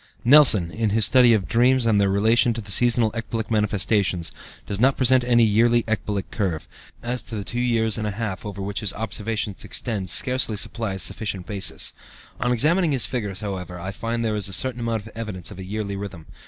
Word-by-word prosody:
Nelson, 120 - +6
in 110 +1 -1
his 110 0 +4
study 125 0 +5
of 105 -4 +1
dreams 125 +1 +3
and 105 -3 +3
their 100 - +2
relation 110 +4 +2
to 110 -3 -6
seasonal 120 -1 +3
ecbolic 115 0 -5
manifestations, 100 -4 0 0.3
does 100 - -4
not 135 +3 +3
present 130 0 +4
any 120 -1 +3
yearly 115 +2 +3
ecbolic 105 -3 -3
curve, 90 -7 -3 0.4
as 120 +1 -2
the 105 -3 -6
two 120 - -4
years 115 -3 +1
and 110 - -2
a - - -1
half 105 -2 -5
over 100 -2 -6
which 100 +1 -3
his 105 -4 0
observations 110 -1 -3
extend 105 -6 -4
scarcely 125 -4 +2
supply 110 -1 -2
a - - -5
sufficient 95 -1 -3
basis. 100 0 -4 0.5
On 125 - 0
examining 155 +7 +2
his 125 -7 +4
figures, 105 -4 -4
however, 90 -4 -6
I 95 +3 -5
find 115 +3 -3
there 110 -1 -1
is 100 -2 -2
a - - -6
certain 125 +5 0
amount 115 -2 -2
of 110 - -11
evidence 105 -6 -6
of 95 - -10
a - - -6
yearly 100 +1 -4
rhythm. 95 -5 -8
110 Hz, 200 wpm, -23 LUFS, 100-120 Hz, 0.5 s, Nelson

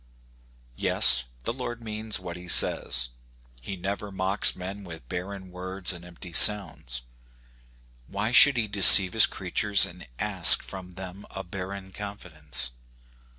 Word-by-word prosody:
Yes, 65 +1 +2 0.2
the - - -5
Lord 120 -2 -9
means 110 -1 -6
what 85 -2 -10
he 90 0 -14
says. - - +2 0.5
He 95 +10 -9
never 100 +3 -8
mocks 95 +1 +1
men 95 +2 -10
with 85 -9 -14
barren 95 +2 -9
words 95 +1 -5
and 85 -1 -13
empty 90 0 -14
sounds. 75 - +4 1.0
Why 105 +3 -6
should 135 +2 +5
he 110 -2 -3
deceive 100 -2 +6
his 110 - +5
creatures, 100 +2 -1
and - - -14
ask - - +3
from 95 -2 -12
them 95 +2 -12
a 95 - -9
barren 95 +1 -10
confidence? 80 -10 -4
95 Hz, 135 wpm, -23 LUFS, 90-100 Hz, 1.0 s, deceive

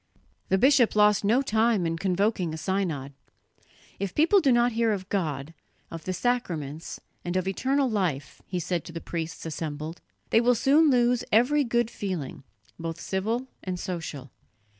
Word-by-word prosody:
The 190 - +3
bishop 260 0 +4
lost 210 -1 +4
no 235 +7 +3
time 220 -5 +2
in 165 0 0
convoking 185 -1 0
a - - -6
synod. 160 -7 -2 0.9
"If 195 -2 -3
people 330 +7 +5
do 280 -7 +3
not 240 0 +4
hear 230 0 +1
of 190 -2 -5
God, 155 -6 -2 0.4
of 165 -1 -8
the 185 - -2
sacraments, 170 - -2 0.2
and 175 +1 -2
of 185 0 -1
eternal 265 +8 +1
life," 180 - -2
he 180 - -2
said 175 0 -2
to - - -8
the 165 - -5
priests 165 -1 -5
assembled, 155 0 -5 0.3
"they 225 - +5
will 245 +1 +4
soon 295 +6 +4
lose 245 -2 +3
every 255 +7 +4
good 235 -2 0
feeling, 165 - -5 0.4
both 165 0 -5
civil 220 +8 -2 0.2
and 185 -1 -4
social. 160 -8 -5
190 Hz, 160 wpm, -27 LUFS, 165-240 Hz, 0.9 s, people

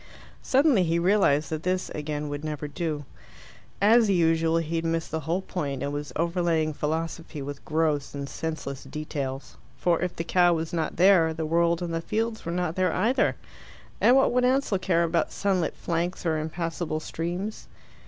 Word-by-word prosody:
Suddenly 270 -5 +4
he 170 -1 +1
realized 170 -5 +3
that 155 -1 -2
this, 185 +1 -1
again, 150 0 -4
would 145 +1 -5
never 150 -1 -4
do. 150 -1 -3 0.7
As 220 +2 +5
usual, 165 -2 +3
he 165 0 -1
had 165 - -1
missed 165 0 -1
the 160 - -1
whole 165 +5 -2
point, 140 -8 -3
and 140 0 -2
was 145 0 -4
overlaying 170 -2 +1
philosophy 160 +1 -3
with 140 0 -6
gross 155 -3 0
and 140 0 -4
senseless 150 -4 -5
details. 135 -1 -5 0.2
For 175 -2 +1
if 180 0 -2
the 165 - -3
cow 175 0 +4
was 160 +1 -4
not 165 -2 -1
there, 175 -3 +5
the 160 0 -3
world 170 +2 +2
and 170 -1 -3
the 165 - -1
fields 220 +4 -2
were - - -1
not 175 -1 -1
there 185 -2 +2
either. 230 +10 +2 0.7
And 250 - +6
what 270 - +4
would 250 +1 +2
Ansell 255 -6 +2
care 170 -3 +2
about 165 -1 0
sunlit 190 -4 0
flanks 175 +2 -2
or 160 -2 +1
impassable 160 0 -3
streams? 175 +7 -4
165 Hz, 175 wpm, -26 LUFS, 155-180 Hz, 0.7 s, And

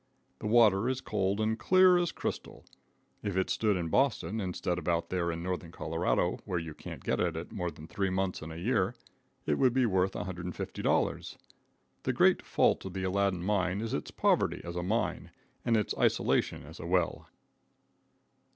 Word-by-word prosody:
The - - -4
water 110 -1 +5
is 130 -1 -1
cold 100 -5 -1
and 110 +1 0
clear 185 +3 +6
as 175 -1 0
crystal. - - -5 0.6
If 100 -2 -3
it 95 - +1
stood 105 -3 +2
in 85 -2 -2
Boston, 115 - +1
instead 90 -1 -2
of - - -9
out 85 -1 0
there 85 -2 0
in 85 +1 -5
northern 90 -2 -3
Colorado, - - 0
where 90 - -2
you 80 -2 -4
can't - - -9
get - - 0
at 85 -2 0
it 85 - -6
more 90 -2 -2
than 75 -1 -11
three 95 +3 -1
months 95 0 -1
in 80 - -7
the 80 - -7
year, 100 +2 +1 0.5
it - - +1
would 130 -3 +4
be 130 -1 +4
worth 95 -3 +1
$150. 90 -1 -2 0.6
The - - -1
great - - +4
fault - - +2
of 95 - -6
the 95 - -2
Aladdin 95 -1 0
mine 95 -1 +1
is 115 +1 -3
its 75 - -3
poverty - - +1
as 85 0 -6
a 90 - -1
mine, 105 +6 -1 0.3
and 115 -2 +3
its 105 - 0
isolation - - +1
as 80 +4 -12
a 85 - -6
well. 90 -2 0
95 Hz, 185 wpm, -30 LUFS, 85-110 Hz, 0.6 s, clear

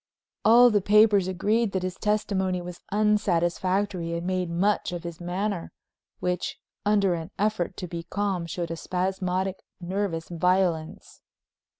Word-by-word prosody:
All 240 +2 +7
the 205 -1 +3
papers 205 -1 +5
agreed 210 +4 +1
that 190 -1 -1
his 185 0 -2
testimony 190 -3 0
was 175 0 -8
unsatisfactory 190 -3 +1
and 170 - -5
made 185 -1 -1
much 190 +5 +1
of 175 -1 -5
his 170 0 -7
manner, 180 +1 -2 0.5
which, 180 -1 -2 0.3
under 200 -3 +3
an 165 0 -4
effort 210 -4 -1
to 180 - -5
be 170 0 -5
calm, 185 0 -2
showed 170 -1 -4
a - - -2
spasmodic, 185 +1 -2 0.2
nervous 180 -2 -2
violence. 175 -2 0
185 Hz, 135 wpm, -26 LUFS, 175-205 Hz, 0.5 s, All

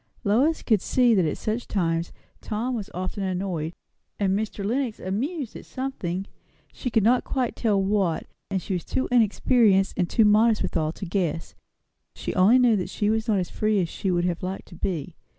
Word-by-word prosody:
Lois 260 +11 +2
could 215 -5 +2
see 245 0 +3
that 185 -5 +3
at 155 - -1
such 220 +2 -3
times 165 -3 -1 0.3
Tom 230 +4 -2
was 215 -5 -4
often 185 +3 -4
annoyed, 180 -4 -2 0.4
and 195 -1 +1
Mr. 210 -1 -3
Lenox 240 +1 -1
amused, 255 - -3
at - - -8
something, 195 -9 -4 0.5
she 250 - -4
could 220 -3 +2
not 245 +4 +4
quite 255 -3 -2
tell 210 -4 +1
what; 195 -4 0 0.2
and 190 -3 -2
she - - -3
was 180 - -2
too 260 - -1
inexperienced, 220 -3 +3
and 180 -3 0
too 220 - +4
modest 215 +1 +4
withal, 155 -3 -1
to 190 - -7
guess. 170 -3 -2 0.6
She - - -4
only 195 +7 +5
knew 245 -3 +5
that 180 - -3
she 210 0 0
was 220 +1 -1
not 215 -3 +2
as 180 -2 -2
free 215 -1 +1
as 175 -3 0
she 195 - -3
would 175 -1 +1
have 175 -2 -1
liked 185 +1 -5
to 175 - -12
be. 170 -2 -3
200 Hz, 195 wpm, -25 LUFS, 180-230 Hz, 0.6 s, only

